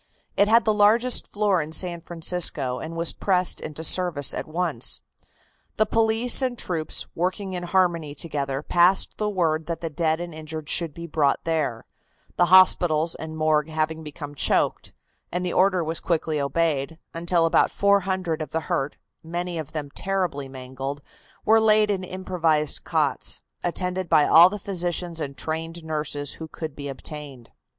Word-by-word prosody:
It 200 - +3
had 230 +1 +4
the 215 - +3
largest 220 +4 +3
floor 205 -4 +1
in 155 +1 -7
San 170 +1 0
Francisco, 165 -6 -1
and 165 +1 -7
was 165 0 +1
pressed 185 -2 +1
into 155 +1 -6
service 165 -5 +4
at - - -5
once. 175 +3 0 0.8
The 215 - +3
police 225 +3 +3
and 255 -2 -1
the - - 0
troops, 160 -4 0
working 185 +3 -2
in 180 - -4
harmony 175 -4 0
together, 140 -3 -3
passed 175 +4 +3
the 210 -1 0
word 160 -5 -1
that 170 -1 -3
the 165 -2 -4
dead 160 +1 0
and 175 -1 -6
injured 155 0 -7
should 165 -4 +1
be 170 - -7
brought 150 -3 0
there, 150 -9 -2 0.5
the 175 - +3
hospitals 170 -3 +5
and 160 0 -8
morgue 155 -1 +1
having 160 0 -2
become 150 -1 -8
choked, 145 - +1 0.4
and 180 +1 -2
the 180 - -2
order 185 -1 +3
was 160 +1 -3
quickly 160 -3 -1
obeyed, 150 +1 -1 0.2
until 170 0 +1
about 165 - +3
400 190 -5 0
of 155 - -5
the 160 - -2
hurt, 135 -2 -3 0.3
many 175 +1 -4
of 155 - -7
them 145 -3 -5
terribly 180 -9 -2
mangled, 135 +2 -7 0.4
were 220 +1 +5
laid 215 -1 +4
in 190 -2 -2
improvised 170 -5 -1
cots, - - -1 0.2
attended 180 0 -2
by 155 -2 +5
all 170 +3 +8
the 205 - -5
physicians 175 -3 -2
and 140 -2 -5
trained 165 +1 -4
nurses 150 -2 -3
who 160 - -5
could 155 -2 -7
be 145 -1 -7
obtained. 135 -2 -9
165 Hz, 165 wpm, -24 LUFS, 155-185 Hz, 0.8 s, all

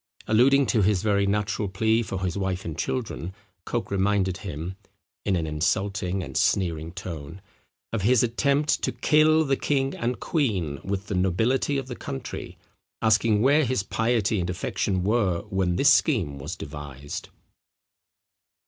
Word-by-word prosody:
Alluding 135 +5 +5
to 115 -4 +2
his 100 -1 +2
very 100 -2 +2
natural 105 0 0
plea 110 +4 +1
for 95 -4 -4
his 90 - -2
wife 95 -1 -2
and 80 - -4
children, 95 -2 -3 0.3
Coke 120 -4 -3
reminded 95 -1 +1
him, 90 -2 -6 0.5
in 100 - +2
an 85 -2 -1
insulting 90 +4 -1
and - - -8
sneering 85 -4 +1
tone, 85 -2 -7 0.5
of 115 - 0
his 120 +4 +4
attempt 140 +5 +1
to - - 0
kill 155 +1 +4
the 135 -1 +2
king 135 -1 0
and 120 +1 -2
queen 95 - -1
with 100 0 -3
the 105 - -4
nobility 110 +10 +1
of 135 - -3
the 125 -1 -6
country, 65 - -6 0.4
asking 110 -1 +3
where 145 +4 +5
his 130 -6 0
piety 115 -1 +1
and 90 0 -2
affection 90 +1 -1
were 100 -5 +1
when 95 -2 +1
this 140 +9 +6
scheme 95 - +1
was 75 +6 -5
devised? 70 -2 -7
100 Hz, 150 wpm, -25 LUFS, 90-120 Hz, 0.5 s, this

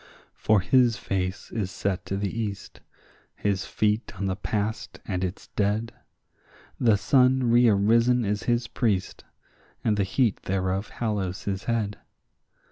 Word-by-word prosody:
For 105 -3 +2
his 120 +3 +3
face 95 0 -3
is 105 -5 -2
set 95 0 -3
to 95 - -2
the 100 +1 -2
east, 105 -4 -5 0.6
his 100 -2 -1
feet 105 +2 0
on 100 - -1
the 95 -1 0
past 105 +2 -3
and 95 -2 -2
its 95 +1 -5
dead; 105 +3 -1 0.9
The 115 -4 +4
sun 130 +1 +3
rearisen 115 +1 +4
is 105 +1 -2
his 120 -1 +1
priest, 105 -7 -1 0.6
and 105 -2 +1
the 100 - +2
heat 95 +3 +1
thereof 95 +2 -1
hallows 100 -5 -3
his 95 -1 -3
head. 110 -3 -1
105 Hz, 135 wpm, -26 LUFS, 95-115 Hz, 0.9 s, The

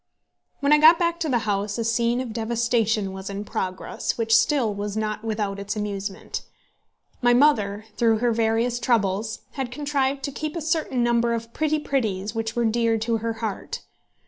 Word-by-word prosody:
When 285 +1 +4
I 300 - +6
got 320 +2 +8
back 340 0 0
to 325 -3 -1
the 250 - +3
house 205 0 -1
a 230 - -1
scene 235 +2 +1
of 240 -4 -5
devastation 225 -3 0
was 190 +1 -6
in 200 +1 -5
progress, 185 -2 -3
which 225 -1 +3
still 260 -8 +3
was 205 +1 -4
not 215 0 -2
without 210 -3 -2
its 200 +2 -4
amusement. 200 -2 -4 0.8
My 245 -1 +5
mother, 215 -7 +3
through 225 -2 +3
her 240 +2 +1
various 230 +2 +1
troubles, 215 -3 0
had 265 -3 -4
contrived 275 0 -1
to 280 - -2
keep 305 +3 -4
a 335 - -3
certain 310 -6 0
number 235 0 +2
of 230 0 -6
pretty 310 0 +1
pretties 220 -9 -1
which 225 0 -3
were 240 -1 +1
dear 230 0 +2
to 225 +1 0
her 230 +1 -2
heart. 210 - -5
230 Hz, 180 wpm, -24 LUFS, 210-255 Hz, 0.8 s, got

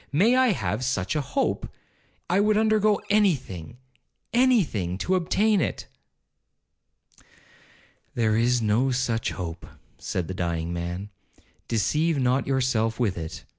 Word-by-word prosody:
May 205 - +4
I 260 0 +4
have 110 - -1
such 120 -3 -1
a 150 - +1
hope! 140 0 -2 0.6
I 180 +3 +2
would 210 +1 +3
undergo 215 -1 +3
any 205 -4 +4
thing—any 130 - -2
thing, 95 - -3
to 180 - -1
obtain 195 +3 +2
it.' - - -3 2.3
'There 110 -2 +2
is 120 +1 +2
no 110 +5 +2
such 125 -3 -1
hope,' 85 -3 -6 0.3
said 90 -3 -3
the 95 - -4
dying 85 -2 -2
man, 85 +4 -4 0.6
'deceive 150 +8 +1
not 130 0 +1
yourself 125 -4 0
with 110 -6 +1
it. 80 -1 -7
125 Hz, 130 wpm, -25 LUFS, -, 2.3 s, May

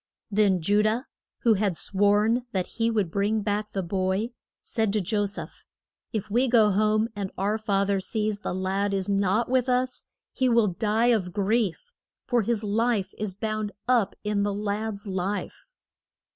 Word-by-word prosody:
Then 200 -3 +3
Ju 205 +5 +3
dah, 220 +4 +1 0.4
who 230 - +5
had 200 -4 0
sworn 210 +5 +2
that 185 -2 0
he 230 0 -1
would 210 -7 0
bring 205 +3 +1
back 210 +1 -1
the 195 - -2
boy, 190 +5 -1 0.3
said 220 -3 0
to 215 - +2
Jo 205 +2 0
seph: 200 - -6 0.5
If 215 -2 -3
we 240 +5 +2
go 225 -4 +5
home, 215 +2 +2
and 200 -2 -3
our 205 +3 0
fath 200 -2 0
er 195 - +2
sees 210 +2 -2
the 190 - -4
lad 195 +2 0
is 195 +1 -1
not 200 +3 +2
with 255 0 +1
us, 250 0 0 0.3
he 260 -2 +1
will 235 -2 +4
die 220 +6 +1
of 185 -5 -1
grief. 215 - 0 0.3
For 245 -2 +2
his 225 0 -1
life 210 -2 0
is 210 -3 -3
bound 215 0 -3
up 240 -5 +2
in 210 -1 0
the 200 0 0
lad's 210 0 -3
life. 195 - -4
210 Hz, 170 wpm, -26 LUFS, 195-225 Hz, 0.5 s, who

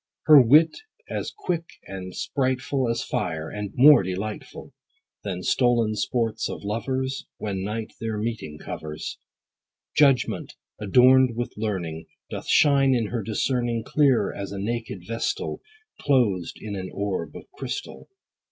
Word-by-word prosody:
Her 150 -3 +9
wit 150 +7 +5 0.4
as - - -2
quick 175 - -3 0.2
and 95 -1 -7
sprightful 130 -1 -1
As 115 0 -1
fire, 80 0 -3
and 105 -1 -4
more 145 +1 +8
delightful 95 +3 -6 0.5
Than 95 -3 -4
the - - -10
stolen 120 -4 +2
sports 115 +2 -1
of - - -6
lovers, 130 +6 -2
When 95 -3 -3
night 110 +2 -4
their 110 -1 -2
meeting 105 -9 -4
covers. 75 0 -6 0.8
Judgment, 135 -5 +2 0.2
adorn'd 125 +4 +5
with 120 +1 -3
learning, 90 -7 -3 0.2
Doth - - -6
shine 140 -3 +5
in 115 -4 0
her 120 -2 -2
discerning, 120 +2 -1
Clear 135 -9 +2
as 100 -1 -6
a 100 - -5
naked 105 -2 -4
vestal 115 - -3 0.4
Closed 110 - +1
in 105 -2 -6
an 95 -1 -5
orb 100 -2 -3
of - - -8
crystal. - - -6
115 Hz, 135 wpm, -25 LUFS, 100-130 Hz, 0.8 s, Her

